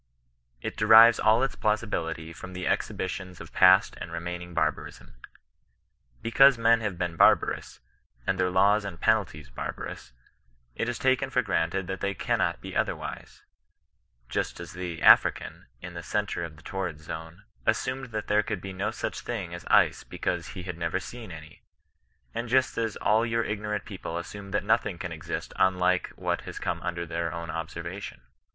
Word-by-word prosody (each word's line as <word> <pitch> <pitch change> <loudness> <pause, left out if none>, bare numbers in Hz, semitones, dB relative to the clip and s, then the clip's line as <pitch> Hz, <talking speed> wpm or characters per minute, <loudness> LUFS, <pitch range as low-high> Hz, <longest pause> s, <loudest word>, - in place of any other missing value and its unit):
It - - -4
derives 115 +1 +8
all 110 +3 +4
its 135 - -1
plausibility 85 -7 -1
from 95 - -9
the 90 0 -4
exhibitions 95 -1 -2
of - - -11
past - - +6
and 85 - -6
remaining 90 +1 -5
barbarism. - - -2 1.1
Because 135 +3 +6
men 115 0 +4
have 105 -5 -3
been 90 -1 -2
barbarous, - - +3 0.4
and 95 -1 0
their 90 0 +2
laws 100 +3 +4
and 95 -5 -6
penalties 90 - 0
barbarous, - - -6 0.6
it 115 - -2
is 120 - -3
taken 130 +1 +2
for 125 -1 +1
granted 95 -1 0
that 95 +1 -5
they 100 0 -1
cannot - - 0
be - - -8
otherwise; - - -3 0.8
just - - -2
as 85 -1 -8
the 90 -2 -5
African, - - +5 0.2
in 90 -1 -7
the 85 - -6
centre 105 -1 -2
of 80 -2 -7
the - - -17
tor 95 -1 -3
rid 80 -4 -5
zone, 80 +4 -8 0.2
assumed 130 +1 0
that 110 -3 -4
there 105 0 +3
could 105 -1 -3
be 95 +1 -7
no 95 +2 -1
such - - -4
thing 100 -8 -5
as 85 - -8
ice - - +4
because - - -3
he 90 - -5
had 90 -2 -6
never 85 +2 -1
seen 115 0 -9
any; 80 -1 -11 0.7
and 120 0 -4
just 130 +1 +3
as 115 -2 -1
all 110 +2 +2
your 115 0 0
ignorant 105 -1 -3
people 90 -5 -6
assume 100 +3 -7
that 105 +1 -1
nothing 105 -3 +1
can 90 0 -5
exist 80 -2 -5
unlike 90 -1 +2
what - - -1
has - - -8
come - - -2
under 85 -1 -3
their 85 0 -2
own 85 -1 -5
observation. 85 +3 -6
95 Hz, 170 wpm, -27 LUFS, 85-110 Hz, 1.1 s, derives